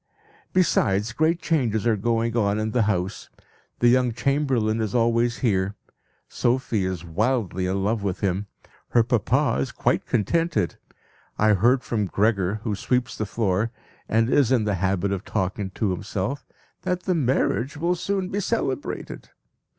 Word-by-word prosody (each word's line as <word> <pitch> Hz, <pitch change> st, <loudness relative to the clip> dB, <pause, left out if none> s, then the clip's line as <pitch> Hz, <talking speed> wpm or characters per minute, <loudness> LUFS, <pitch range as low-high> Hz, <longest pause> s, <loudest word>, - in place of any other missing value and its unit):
Besides, 115 Hz, -, +2 dB
great 160 Hz, +5 st, +2 dB
changes 120 Hz, -11 st, +1 dB
are 115 Hz, -2 st, +3 dB
going 115 Hz, +2 st, 0 dB
on 105 Hz, -3 st, +2 dB
in 110 Hz, 0 st, -1 dB
the 125 Hz, -, +2 dB
house. 95 Hz, -3 st, -1 dB, 0.5 s
The 120 Hz, -, +5 dB
young 125 Hz, -1 st, +3 dB
chamberlain 125 Hz, -4 st, +1 dB
is 110 Hz, +2 st, -2 dB
always 115 Hz, 0 st, +2 dB
here. 100 Hz, -2 st, +1 dB, 0.5 s
Sophie 120 Hz, -5 st, 0 dB
is 90 Hz, -2 st, -4 dB
wildly 95 Hz, 0 st, 0 dB
in 95 Hz, +1 st, -1 dB
love 110 Hz, +2 st, 0 dB
with 100 Hz, -3 st, -3 dB
him. 100 Hz, +1 st, -1 dB, 0.4 s
Her 120 Hz, -, +4 dB
papa 120 Hz, -, +1 dB
is 70 Hz, -, -3 dB
quite -, -, 0 dB
contented. 160 Hz, -, 0 dB, 0.6 s
I 110 Hz, -, +3 dB
heard 120 Hz, +7 st, +3 dB
from 105 Hz, -4 st, -1 dB
Gregor, 100 Hz, 0 st, +1 dB
who 110 Hz, -, -1 dB
sweeps 125 Hz, +4 st, -1 dB
the 110 Hz, -, -3 dB
floor, 105 Hz, 0 st, 0 dB, 0.4 s
and 115 Hz, +1 st, +3 dB
is 130 Hz, -1 st, +3 dB
in 125 Hz, -4 st, +3 dB
the 105 Hz, -1 st, 0 dB
habit 95 Hz, +1 st, +1 dB
of 100 Hz, -1 st, -2 dB
talking 95 Hz, +1 st, -2 dB
to 105 Hz, -4 st, 0 dB
himself, 105 Hz, +8 st, -3 dB, 0.3 s
that 180 Hz, 0 st, -2 dB
the 185 Hz, -, +1 dB
marriage 135 Hz, -1 st, 0 dB
will 170 Hz, +4 st, +1 dB
soon 185 Hz, +1 st, -2 dB
be 200 Hz, -, -2 dB
celebrated. 200 Hz, -, -3 dB
115 Hz, 155 wpm, -24 LUFS, 100-130 Hz, 0.6 s, The